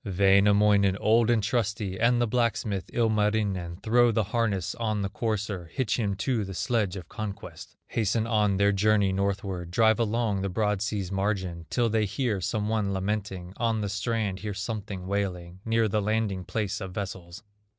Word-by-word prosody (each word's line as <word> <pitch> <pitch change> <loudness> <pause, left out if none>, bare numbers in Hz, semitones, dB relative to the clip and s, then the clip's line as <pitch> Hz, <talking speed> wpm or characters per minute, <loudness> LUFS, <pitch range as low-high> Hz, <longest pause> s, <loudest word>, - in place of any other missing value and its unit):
Wainamoinen, 100 0 +4
old 115 +3 +3
and 115 -3 +3
trusty, 105 -3 -1
And 120 +1 +3
the 120 - +3
blacksmith, 110 -4 -1
Ilmarinen, 105 -6 0
Throw 120 +1 +4
the 110 0 +1
harness 100 -4 -1
on 110 -3 -1
the 95 - -2
courser, 105 -4 -3
Hitch 125 -4 -1
him 100 -3 0
to 115 +2 -1
the 95 -1 -6
sledge 105 -4 0
of 90 -4 -8
conquest, 105 -2 -7
Hasten 110 0 0
on 105 -4 +2
their 100 +1 +4
journey 100 0 +3
northward; 95 -2 -2
Drive 110 +5 +3
along 115 -3 0
the 100 - -1
broad 105 0 0
sea's 100 -3 -2
margin 95 -4 -2
Till 120 -2 +1
they 110 -1 +1
hear 110 -2 -1
some 105 +3 -1
one 105 -2 0
lamenting, 95 -2 -3
On 115 -2 0
the 100 - -2
strand 105 -2 -1
hear 105 -2 -5
something 100 -3 -5
wailing 90 -3 -3
Near 115 0 +2
the 105 +1 0
landing 105 -3 -1
place 105 -1 -2
of 95 -2 -6
vessels. 95 -2 -6
105 Hz, 170 wpm, -27 LUFS, 95-110 Hz, -, Wainamoinen